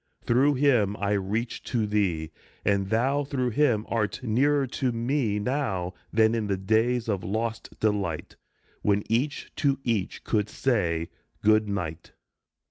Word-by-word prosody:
Through 135 +5 +4
him 120 -7 +3
I 100 +1 -1
reach 105 +4 -1
to 115 -4 0
thee, 90 -7 0 0.3
and 100 -1 +1
thou 135 +6 +2
Through 130 -3 -1
him 120 -5 +2
art 115 +2 -1
nearer 135 +5 +2
to 130 0 -1
me 115 -2 0
now 105 -6 -1 0.2
Than 110 0 +4
in 110 -2 -1
the 100 -1 0
days 110 +5 +1
of 100 -4 -1
lost 115 +3 -3
delight 100 -7 -1 0.5
When 105 0 +2
each 130 +6 -1
to 140 -2 +2
each 110 -6 -1
could 105 -2 0
say, 85 -12 0
" - - -42
Good 110 0 +4
night." 85 -5 -4
110 Hz, 145 wpm, -27 LUFS, 100-125 Hz, 0.5 s, Through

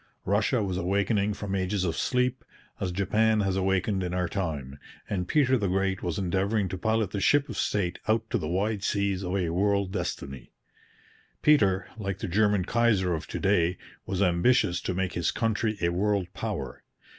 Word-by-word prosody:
Russia 110 +4 +1
was 95 -2 -2
awakening 100 +3 +1
from 100 -1 -5
ages 95 0 0
of 85 -3 -1
sleep, 125 0 0 0.4
as 95 -2 -2
Japan 105 +4 +2
has 95 -2 0
awakened 95 +1 +1
in 90 -1 -2
our 90 -1 0
time, 75 -8 -4 0.3
and 90 -3 -2
Peter 130 -2 +3
the 100 - 0
Great 95 0 0
was 85 -3 -2
endeavouring 95 +2 0
to 95 - -4
pilot 110 +1 0
the 100 - -2
ship 140 +9 +3
of - - -5
state 95 -4 -1
out 110 +1 +1
to - - +1
the 75 - -4
wide 100 +4 -1
seas 100 -2 0
of 90 +1 -2
a 90 -4 0
world 100 +1 +1
destiny. 65 -8 -5 0.9
Peter, 100 -11 +4
like 100 -3 -3
the - - -4
German 105 0 +2
Kaiser 110 -6 +2
of 80 -2 -4
to - - -5
day, 90 -3 +2 0.3
was 95 +1 0
ambitious 90 +1 +2
to 95 - -3
make 95 0 -1
his 85 -2 0
country 110 -1 0
a 85 - +2
world 95 0 0
power. 80 - -4
95 Hz, 180 wpm, -27 LUFS, 90-105 Hz, 0.9 s, Peter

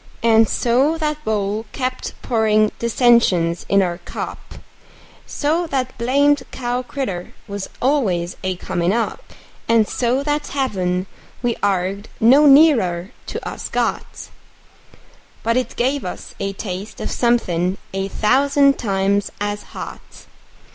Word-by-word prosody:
And 225 -1 +5
so 265 +7 +2
that 300 -1 -2
bowl 215 0 -1
kept 255 -1 -4
pourin' 215 -2 +2
dissensions 230 -8 +3
in 200 0 +4
our 175 -1 -2
cup; - - -6
And - - -12 0.7
so 325 +4 0
that 260 -4 -2
blamed 285 +4 +3
cow 245 0 -2
critter 250 -9 -5
was 200 -1 -5
always 200 -11 +1
a 185 0 -1
comin' 180 0 -1
up; 230 0 -1 0.5
And 225 -2 +4
so 255 +3 0
that 295 0 -1
heaven 185 -9 -1 0.4
we 240 -1 +2
arg'ed 195 +1 -1
no 270 +7 +6
nearer 235 - +5 0.2
to - - -5
us - - -6
got, - - -3 1.1
But 230 0 +1
it 255 0 -1
gave 265 +3 0
us 180 - -7
a 195 0 -2
taste 195 +1 -6
of - - -4
somethin' 185 -7 +1 0.2
a 195 0 -2
thousand 275 +7 +3
times 200 -2 0
as 205 0 -2 0.2
hot. - - -9
225 Hz, 130 wpm, -20 LUFS, 195-265 Hz, 1.1 s, no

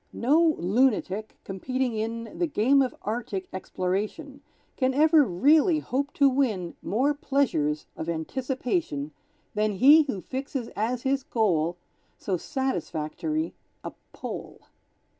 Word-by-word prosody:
No 310 +6 +3
lunatic, 215 0 +1
competing 255 +6 -2
in 225 +1 -4
The 350 - +2
game 275 0 +3
of 260 - -1
Arctic 210 -4 -3
exploration, 205 - -3 0.3
Can 260 -1 +1
ever 310 +1 +6
really 295 - +4
hope 280 -1 -2
to 280 - +4
win 230 -11 0
More 265 +8 +1
pleasures 200 - 0
of 160 - -5
anticipation 245 - -2 0.4
Than 210 -1 +1
he 285 +10 +7
who 260 -9 -3
fixes 265 +2 -5
as 235 +3 -2
his 270 0 +1
goal 175 -9 0 0.4
So 190 - -2
satisfactory 265 - -2 0.3
a - - -5 0.2
Pole. - - -7
250 Hz, 120 wpm, -26 LUFS, 190-280 Hz, 0.4 s, he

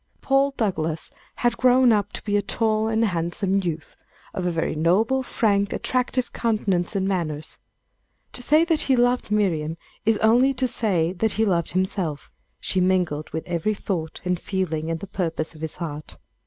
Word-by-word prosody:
Paul 275 +1 +3
Douglass 165 -7 -2 0.2
had 240 -1 0
grown 250 -1 +5
up 205 -1 +1
to - - -7
be 205 -1 -1
a 205 - +3
tall 215 +1 0
and 225 +1 +2
handsome 185 +1 0
youth, 165 -3 -4 0.4
of 180 -1 -2
a - - +1
very 165 -2 -1
noble, 195 +12 +2
frank, 200 -5 +1
attractive 255 0 -1
countenance 210 -5 0
and 190 -1 +1
manners. 155 -5 -2 0.7
To - - -4
say 305 +6 +4
that 325 -2 +2
he 265 - +3
loved 245 -1 +2
Miriam 170 -7 0 0.3
is 220 0 +3
only 245 +6 +4
to 255 +1 0
say 185 -8 0
that 215 +3 0
he 220 - +2
loved 175 -4 0
himself. 185 -5 -2 0.3
She 185 - 0
mingled 180 -5 +1
with 160 +1 -4
every 175 +5 -1
thought, 170 -6 -4
and 180 -1 0
feeling, 165 -5 -2
and 165 0 -2
purpose 165 -4 -2
of 155 - -14
his 160 -1 -3
heart. 155 -3 -6
195 Hz, 170 wpm, -24 LUFS, 165-225 Hz, 0.7 s, grown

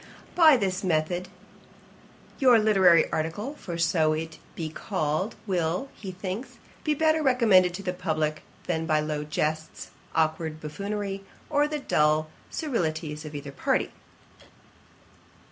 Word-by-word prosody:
By 315 -5 +7
this 190 -3 -1
method, 175 +1 0 1.1
your 255 -4 +7
literary 190 -6 +5
article, 165 - -2
for 170 -3 -5
so 160 -2 +2
it 160 +1 -3
might 160 - -14 0.2
be 165 - -3
called, 160 +3 -2
will, 180 +5 -1
he 195 -3 -7
thinks, 185 +6 -6 0.3
be 305 -1 +1
better 315 +1 +3
recommended 215 -10 +4
to 200 - -7
the 180 -1 -2
publick 155 -3 -1 0.2
than 160 0 -1
by 155 -2 +3
low 150 -1 -2
jests, 155 +1 -3 0.2
awkward 160 0 0
buffoonery, 195 +5 -4 0.3
or 295 0 +3
the 300 0 -2
dull 155 - +2 0.2
scurrilities 160 - -2
of 150 0 -8
either 145 -1 -6
party. 140 - 0
175 Hz, 130 wpm, -27 LUFS, 155-210 Hz, 1.1 s, By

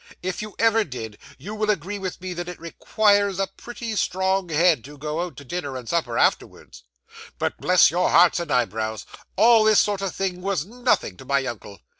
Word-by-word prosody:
If 185 0 -3
you 215 -1 -8
ever 225 -1 +3
did, 115 - -8 0.2
you 205 - -8
will 215 0 -2
agree 200 +1 -1
with 185 -2 -5
me 185 -1 -5
that 175 0 -5
it 180 - -9
requires 200 +3 +1
a 195 - +1
pretty 230 +3 -7
strong 190 -1 0
head 160 -4 +3
to 145 +1 -12
go 150 +3 -3
out 180 -1 -6
to 145 - -11
dinner 140 -2 -4
and 125 -2 -9
supper 130 -8 -1
afterwards. - - -1 0.6
'But - - -2
bless 180 -1 +4
your 180 +2 +1
hearts 175 +1 +5
and 170 - -5
eyebrows, 110 -2 -1 0.3
all 225 +1 +6
this 215 -1 +5
sort 205 -2 +1
of 195 -2 -3
thing 185 -2 -3
was 190 -5 -1
nothing 240 - -1
to 130 - -12
my 140 0 0
uncle! 105 -5 -8
180 Hz, 200 wpm, -23 LUFS, 145-205 Hz, 0.6 s, all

